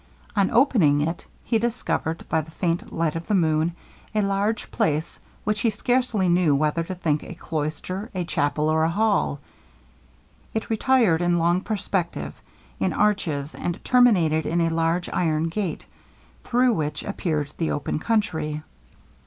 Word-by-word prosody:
On 200 -2 +3
opening 215 - +4
it 165 +3 -3 0.2
he 225 - +1
discovered, 230 -8 -2
by 160 - +1
the 155 - -12
faint 170 +1 -2
light 165 -2 -1
of 165 0 -5
the 210 - +2
moon, 160 -1 +2 0.4
a 210 - +3
large 200 +2 -1
place 155 +1 -1 0.2
which 210 +1 0
he 230 - +2
scarcely 230 -2 +1
knew 175 -4 +3
whether 155 +3 +1
to 185 +3 -5
think 155 -4 0
a 180 - -8
cloister, 165 +6 -4
a 180 -2 -1
chapel, 150 -1 0
or 160 0 +2
a 160 - +3
hall. 205 -6 +1 1.2
It 220 - -2
retired 225 -7 +3
in 175 0 +2
long 170 +2 +2
perspective, 195 -4 -2 0.5
in - - +1
arches, 165 -9 0
and 175 +1 -3
terminated 180 -11 +4
in 170 +2 +1
a 165 - +2
large 165 +2 0
iron 160 -2 0
gate, 190 0 -3 0.6
through 250 0 +3
which 150 -6 -2
appeared 155 -7 -2
the 165 - 0
open 145 +1 -2
country. 160 -9 -1
170 Hz, 155 wpm, -24 LUFS, 155-210 Hz, 1.2 s, opening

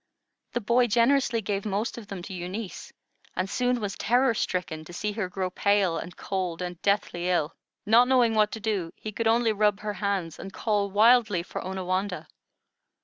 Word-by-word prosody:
The 240 - -1
boy 240 +3 +3
generously 235 0 +2
gave 200 0 -2
most 210 +2 -2
of 230 -4 -9
them 195 -4 -7
to 190 - -7
Eunice, 185 +3 -6 0.4
and 185 - -1
soon 250 +4 0
was 205 -3 -3
terror 245 +2 +2
stricken 180 -6 -2
to 175 - -11
see 210 +4 -2
her 205 -3 -3
grow 185 0 -3
pale, 200 -4 +2
and 175 - -8
cold, 185 -4 -3
and 180 -2 -5
deathly 200 -3 0
ill. 165 -4 +1 0.3
Not 230 +4 +6
knowing 250 -3 +4
what 215 -1 +3
to 220 - -4
do, 200 -6 -2
he 215 - -7
could 225 +2 -1
only 225 0 +3
rub 210 -1 +2
her 210 -1 -3
hands 195 -4 -2
and 195 - -7
call 205 -1 0
wildly 215 -2 +4
for - - -6
Onawandah. 185 +1 -2
205 Hz, 185 wpm, -27 LUFS, 185-225 Hz, 0.4 s, Not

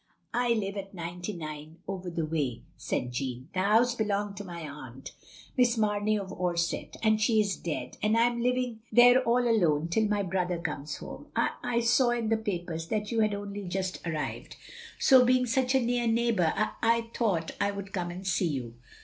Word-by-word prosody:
"I 240 0 +2
live 200 -3 -2
at 195 0 -7
99, 165 -3 -6
over 185 -2 -4
the 165 -2 -2
way," 145 -7 -2
said 125 - -3
Jeanne. 130 +2 -4
"The 185 - -1
house 220 +5 +4
belonged 205 -3 -1
to 205 - -5
my 170 -4 -7
aunt, 135 -3 -9 0.4
Miss 245 -2 +3
Mamey 210 0 +1
of 195 -2 -5
Orsett, 175 -2 -2
and 215 -1 +3
she 220 0 +3
is 200 -2 +1
dead, 165 -3 -5
and 215 +2 +2
I 230 - +5
am 240 0 +1
living 250 -2 0
there 245 +3 +7
all 245 0 +2
alone 170 -8 +2
till 215 +5 +2
my 205 -1 0
brother 180 -1 -1
comes 150 -3 -4
home. - - -9
I - - +2
— - - -26
I 235 -1 +1
saw 240 +2 +4
in 235 -2 0
the 225 - +3
papers 175 -6 -4
that 210 +3 -2
you 230 - 0
had 215 -2 +2
only 200 0 -6
just 185 0 -2
arrived 160 -3 -4 0.3
— 460 - -15
so 260 -2 +7
being 250 0 +3
such 260 +2 +1
a - - +6
near 240 -1 0
neighbour, 225 -7 +2
I 215 - 0
— - - -28
I 230 0 +2
thought 185 -9 0
"l 200 0 +1
would 200 -1 -7
come 175 -2 -2
and 180 +2 -7
see 185 -1 +1
you. 130 -7 -4
205 Hz, 205 wpm, -29 LUFS, 170-230 Hz, 0.4 s, there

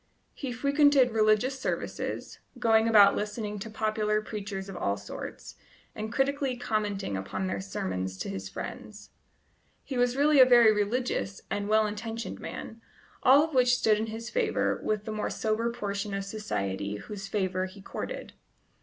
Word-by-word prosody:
He 270 -3 -5
frequented 280 0 +4
religious 220 +4 +2
services, - - -4 0.2
going 225 -2 +4
about 205 -3 +7
listening 210 0 -3
to 225 - -6
popular 215 -1 0
preachers 205 -2 -5
of 195 - -8
all 100 - -1
sorts, 100 0 -8 0.4
and 215 +1 -5
critically 270 0 0
commenting 210 - -2
upon 95 0 -3
their 95 +1 -2
sermons 95 -1 -3
to - - -4
his 95 0 -5
friends. 210 -1 -8 0.7
He 260 -3 -3
was 245 0 +2
really 290 0 +5
a 260 - +10
very 240 -3 +7
religious 210 -1 -1
and 205 0 -2
well 215 0 +4
intentioned 225 +2 -5
man, 225 +1 -7 0.4
all 275 +3 +7
of 320 -1 -4
which 250 -1 +4
stood 215 -3 +3
in 220 - -2
his 225 +1 -6
favour 470 -2 0
with 210 -1 -1
the 220 - -4
more 215 0 -2
sober 225 +2 -1
portion 205 -3 -3
of 195 0 -3
society 100 - -3
whose 195 - -7
favour 185 -2 -1
he 190 +2 -13
courted. - - -6
215 Hz, 160 wpm, -28 LUFS, 195-245 Hz, 0.7 s, a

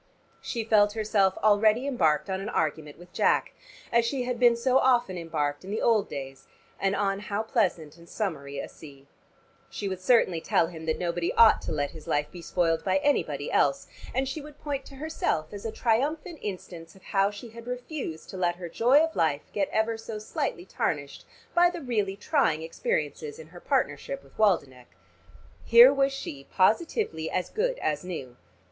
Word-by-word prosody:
She 230 -2 -3
felt 210 -2 +4
herself 210 -3 +1
already 215 +3 +4
embarked 155 - +1
on 190 0 -2
an 205 - -4
argument 155 -1 -2
with 175 0 -16
Jack, - - +2 0.4
as 235 0 +4
she 255 +2 -1
had 245 -1 -3
been 240 -1 +6
so 255 +3 +3
often 240 -7 +2
embarked 155 -3 -2
in 190 - -9
the 215 +2 -2
old 220 -4 +3
days, 135 -1 -7 0.3
and 195 0 +1
on 195 -1 0
how 205 +1 -3
pleasant 175 - -1
and 170 0 -16
summery 140 -9 -4
a - - -4
sea. 140 -3 -14 0.6
She 205 - -4
would 190 -1 -4
certainly 185 -6 +3
tell - - +2
him 165 -1 -9
that 160 - +1
nobody 175 -1 -1
ought 230 -1 +7
to - - -5
let 145 -2 -1
his 155 -2 -12
life 145 0 0
be 175 - -9
spoiled 165 -2 0
by 190 -1 +2
anybody 145 - 0
else, 140 -1 +2 0.3
and 265 +1 0
she 270 +4 -4
would 295 0 -13
point 280 -2 -4
to 275 - -12
herself 270 - -2
as 205 +1 -8
a - - -4
triumphant 290 +10 -1
instance 175 -4 -7
of 190 - -19
how 195 -1 +2
she 205 +3 -9
had 230 +1 -12
refused 250 - -5
to 190 - -7
let 175 -1 +1
her 175 -1 -7
joy 255 - +4
of 325 0 -2
life 155 -3 0
get 195 -2 0
ever 225 +1 0
so 225 -1 -6
slightly 210 -4 -3
tarnished 140 -6 -3 0.3
by 350 0 +5
the 350 0 -6
really 215 -9 -1
trying 205 - +1
experiences 460 - -3
in 480 - -12
her - - -12
partnership - - -1
with - - -21
Waldenech. 140 - 0 0.7
Here 240 +4 +8
was 275 0 +2
she 145 - -7
positively 195 - +1
as 180 - -2
good - - 0
as 150 -1 -2
new. 150 -9 -6
200 Hz, 190 wpm, -27 LUFS, 165-245 Hz, 0.7 s, Here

